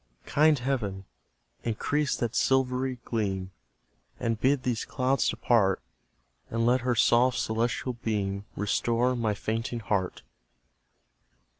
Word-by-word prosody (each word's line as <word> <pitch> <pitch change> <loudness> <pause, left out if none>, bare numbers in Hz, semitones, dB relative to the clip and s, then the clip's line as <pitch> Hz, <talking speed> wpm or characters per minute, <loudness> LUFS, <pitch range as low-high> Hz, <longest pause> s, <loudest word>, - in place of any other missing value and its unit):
Kind 155 +1 +4
Heaven! 115 -7 -2 0.6
increase 140 +5 0
that 120 -1 -2
silvery 130 -1 +1
gleam 95 -5 -2 0.7
And 115 -1 -1
bid 135 0 +2
these 120 -3 -1
clouds 130 +2 +1
depart, 100 -6 +2 0.7
And 115 0 0
let 125 +1 +3
her 125 0 +1
soft 125 +2 +4
celestial 120 +3 -1
beam 100 -4 -2
Restore 120 +4 +1
my 110 -3 0
fainting 115 +3 -3
heart! 100 -4 -2
120 Hz, 110 wpm, -28 LUFS, 105-125 Hz, 0.7 s, Kind